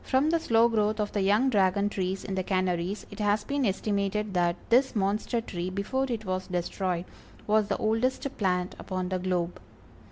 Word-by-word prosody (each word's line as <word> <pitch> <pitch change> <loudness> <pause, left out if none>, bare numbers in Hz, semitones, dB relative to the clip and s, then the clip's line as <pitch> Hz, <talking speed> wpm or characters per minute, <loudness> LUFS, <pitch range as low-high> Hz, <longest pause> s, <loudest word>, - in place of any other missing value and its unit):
From 275 +4 +2
the 335 - +3
slow 230 -6 +4
growth 215 -1 +1
of 210 -1 -1
the 205 - 0
young 210 +7 +3
Dragon 200 -1 +3
trees 190 -1 -2
in 195 - -4
the 190 - 0
Canaries, 185 +1 -1
it - - -10
has 205 0 +2
been 280 0 0
estimated 200 +1 -1
that 175 -1 +2 0.2
this 260 +2 +4
monster 210 +4 0
tree 180 -5 -4
before 205 +8 -1
it 225 -3 -3
was 185 0 -2
destroyed, 180 0 -2 0.4
was 215 0 +3
the 200 - 0
oldest 225 +6 0
plant 180 -2 0
upon 185 -1 -3
the 185 -1 -1
globe. 180 -1 -1
200 Hz, 185 wpm, -28 LUFS, 185-220 Hz, 0.4 s, slow